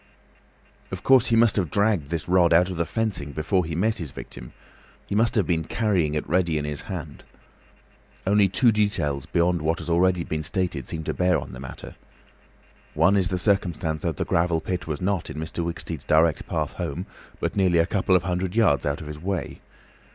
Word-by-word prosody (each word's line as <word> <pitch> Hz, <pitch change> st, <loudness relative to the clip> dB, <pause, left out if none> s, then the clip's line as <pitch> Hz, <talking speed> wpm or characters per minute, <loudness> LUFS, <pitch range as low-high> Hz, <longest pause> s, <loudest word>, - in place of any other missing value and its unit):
Of -, -, -6 dB
course, 130 Hz, -2 st, +5 dB
he 115 Hz, -, +2 dB
must 115 Hz, -2 st, +4 dB
have 90 Hz, -6 st, 0 dB
dragged 100 Hz, -7 st, +1 dB
this 85 Hz, -2 st, -3 dB
rod 90 Hz, -2 st, +4 dB
out 90 Hz, +3 st, +4 dB
of 90 Hz, -, -5 dB
the 85 Hz, -, 0 dB
fencing 100 Hz, -11 st, -2 dB
before 90 Hz, +5 st, 0 dB
he 80 Hz, 0 st, -4 dB
met 110 Hz, +5 st, 0 dB
his 80 Hz, -, -5 dB
victim—he -, -, -11 dB
must 115 Hz, +3 st, +2 dB
have 105 Hz, -, +2 dB
been 80 Hz, -2 st, 0 dB
carrying 90 Hz, -6 st, 0 dB
it 75 Hz, -, -2 dB
ready 85 Hz, -2 st, +1 dB
in 75 Hz, -, -2 dB
his 75 Hz, -1 st, -4 dB
hand. -, -, -6 dB, 1.0 s
Only 100 Hz, 0 st, +4 dB
two 120 Hz, +5 st, +4 dB
details 100 Hz, -11 st, 0 dB
beyond 85 Hz, 0 st, +1 dB
what 80 Hz, +2 st, 0 dB
has 85 Hz, -, -5 dB
already 90 Hz, +1 st, +3 dB
been 80 Hz, -1 st, -3 dB
stated 85 Hz, -, -2 dB
seem 80 Hz, -1 st, -3 dB
to -, -, -2 dB
bear 90 Hz, -1 st, +2 dB
on -, -, -6 dB
the 60 Hz, -, -8 dB
matter. 65 Hz, -2 st, -9 dB, 1.0 s
One 100 Hz, -, +4 dB
is 95 Hz, -2 st, +2 dB
the 90 Hz, -, -1 dB
circumstance 90 Hz, -5 st, 0 dB
that -, -, -2 dB
the -, -, -1 dB
gravel 85 Hz, -1 st, +1 dB
pit 90 Hz, 0 st, -4 dB
was 75 Hz, 0 st, -4 dB
not 95 Hz, -2 st, -1 dB
in -, -, -7 dB
Mr. 80 Hz, +2 st, -3 dB
Wicksteed's 85 Hz, -2 st, -5 dB
direct 80 Hz, 0 st, +2 dB
path -, -, -2 dB
home, 85 Hz, +1 st, -4 dB, 0.3 s
but -, -, -2 dB
nearly 95 Hz, -4 st, +3 dB
a 85 Hz, -, +4 dB
couple 95 Hz, 0 st, +1 dB
of 90 Hz, -, +3 dB
hundred 90 Hz, +1 st, -2 dB
yards 85 Hz, -, +3 dB
out 70 Hz, +2 st, -2 dB
of 75 Hz, -, -8 dB
his 75 Hz, 0 st, -7 dB
way. 95 Hz, +3 st, -4 dB
85 Hz, 205 wpm, -24 LUFS, 80-95 Hz, 1.0 s, course